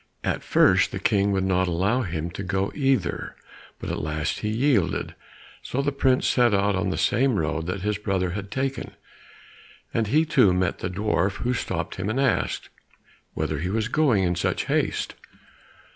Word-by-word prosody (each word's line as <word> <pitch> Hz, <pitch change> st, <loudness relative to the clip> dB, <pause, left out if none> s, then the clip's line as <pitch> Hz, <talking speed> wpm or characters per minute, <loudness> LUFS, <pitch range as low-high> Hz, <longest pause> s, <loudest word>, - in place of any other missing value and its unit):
At -, -, -1 dB
first -, -, +4 dB
the -, -, -4 dB
King 100 Hz, 0 st, +2 dB
would 95 Hz, -1 st, +1 dB
not 95 Hz, -1 st, +1 dB
allow 95 Hz, +9 st, +1 dB
him 85 Hz, -5 st, -3 dB
to 95 Hz, -, -6 dB
go 95 Hz, 0 st, -1 dB
either, 135 Hz, -, 0 dB, 0.4 s
but -, -, -5 dB
at -, -, -3 dB
last 75 Hz, 0 st, -2 dB
he 105 Hz, -, -2 dB
yielded, 115 Hz, -, +1 dB, 0.5 s
so 140 Hz, +2 st, -2 dB
the 145 Hz, -, +1 dB
prince 135 Hz, -2 st, +2 dB
set 120 Hz, -4 st, +3 dB
out 100 Hz, 0 st, +2 dB
on 95 Hz, -, 0 dB
the -, -, -2 dB
same 130 Hz, +1 st, +2 dB
road 80 Hz, -1 st, -1 dB
that 95 Hz, +2 st, -3 dB
his 105 Hz, -1 st, -1 dB
brother 95 Hz, -4 st, -1 dB
had 100 Hz, +1 st, -5 dB
taken, 135 Hz, +4 st, -3 dB, 1.0 s
and 115 Hz, -2 st, +1 dB
he 155 Hz, +8 st, +3 dB
too 125 Hz, -, +4 dB
met 90 Hz, -1 st, 0 dB
the 90 Hz, -, -3 dB
dwarf, 100 Hz, 0 st, 0 dB
who 125 Hz, +1 st, +1 dB
stopped -, -, -3 dB
him 95 Hz, +1 st, -3 dB
to 110 Hz, +5 st, -1 dB
ask, 135 Hz, -3 st, 0 dB, 0.7 s
whither 75 Hz, -, -2 dB
he 90 Hz, +4 st, -2 dB
was 110 Hz, +2 st, -1 dB
going 130 Hz, -9 st, +3 dB
in 90 Hz, -1 st, +1 dB
such 85 Hz, -, -1 dB
haste? -, -, -1 dB
100 Hz, 180 wpm, -25 LUFS, 90-125 Hz, 1.0 s, first